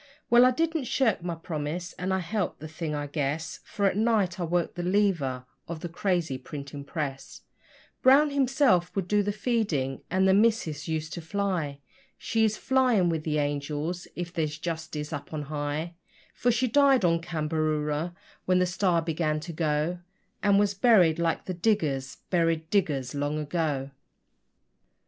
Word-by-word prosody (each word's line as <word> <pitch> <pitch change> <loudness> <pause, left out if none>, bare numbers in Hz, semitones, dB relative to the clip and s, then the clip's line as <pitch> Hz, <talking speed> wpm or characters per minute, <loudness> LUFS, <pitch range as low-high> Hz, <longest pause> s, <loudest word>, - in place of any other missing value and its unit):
Well, 240 +1 +8
I - - +6
didn't 325 +2 0
shirk 230 -7 +1
my 170 -1 -3
promise, 165 +2 -4
and 185 +1 -3
I 190 - +2
helped 200 +2 -2
the 155 - -7
thing, 160 -1 -4
I 145 0 -2
guess, 150 +2 -3
For 200 - -2
at 195 - +3
night 210 -5 +1
I - - -1
worked 175 +1 0
the 175 - -4
lever 175 -10 +1 0.2
of 165 -1 -6
the 175 - -4
crazy 170 -6 -1
printing 140 +1 -7
press; 140 -2 -5 0.6
Brown 285 +3 +6
himself 260 - +2
would 195 -3 -1
do 210 +1 +3
the 205 0 -1
feeding, 200 - -1
and 190 +1 +2
the 190 - +5
missus 200 -9 +2
used 155 -1 -3
to 170 - -5
'fly' 165 -6 -2 0.4
She 225 -1 0
is 215 -1 +2
flying 250 -9 +3
with 160 -2 -1
the 150 -1 -1
angels, 145 +4 -2
if 175 0 -5
there's 155 -4 -2
justice 160 -2 -4
up - - -6
on 150 -1 -3
high, 150 +3 -3 0.4
For 245 - 0
she 255 +2 +2
died 270 -3 +4
on 170 -1 +2
Cambaroora 155 0 -1 0.3
when 185 0 +3
the 180 - +3
STAR 180 -2 +1
began 155 -2 0
to 170 +1 -7
go, 155 +2 0 0.4
And 200 -1 +4
was 205 0 +3
buried 190 -7 +4
like 165 -1 0
the 185 - -3
diggers 155 -9 0
buried 165 -2 +1
diggers 145 -11 +1
long 145 +1 -1
ago. 150 -3 -2
170 Hz, 165 wpm, -27 LUFS, 150-200 Hz, 0.6 s, Well